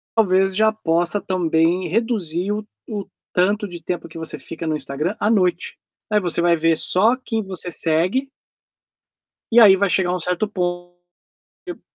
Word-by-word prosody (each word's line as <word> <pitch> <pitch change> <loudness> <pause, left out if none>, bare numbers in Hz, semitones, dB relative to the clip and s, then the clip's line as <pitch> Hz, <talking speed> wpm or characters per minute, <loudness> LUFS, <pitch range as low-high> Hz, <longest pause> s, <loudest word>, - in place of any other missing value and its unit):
talvez 190 -3 +3
já 220 +2 +4
possa 175 -2 0
também 175 0 +1
reduzir 200 -3 -1
o 210 0 -3 0.2
o 205 -3 -4 0.3
tanto 200 +3 +1
de 175 -1 -8
tempo 170 0 -5
que 165 - -11
você 160 -2 -4
fica 160 +4 -6
no 155 - 0
Instagram 150 +7 -3
à 210 - +1
noite. 185 -4 0 0.3
Aí 210 - +3
você 175 -3 -1
vai 170 0 +3
ver 165 +1 +2
só 220 +10 +2
quem 225 -3 -3
você 185 -3 -4
segue. 180 - 0 1.2
E 235 - +6
aí 205 -4 +8
vai 200 0 +1
chegar 180 -1 +1
um - - -3
certo 180 +5 -1
pon 175 -2 -4 0.7
que 360 - -5
o - - -21
180 Hz, 170 wpm, -21 LUFS, 170-210 Hz, 1.2 s, aí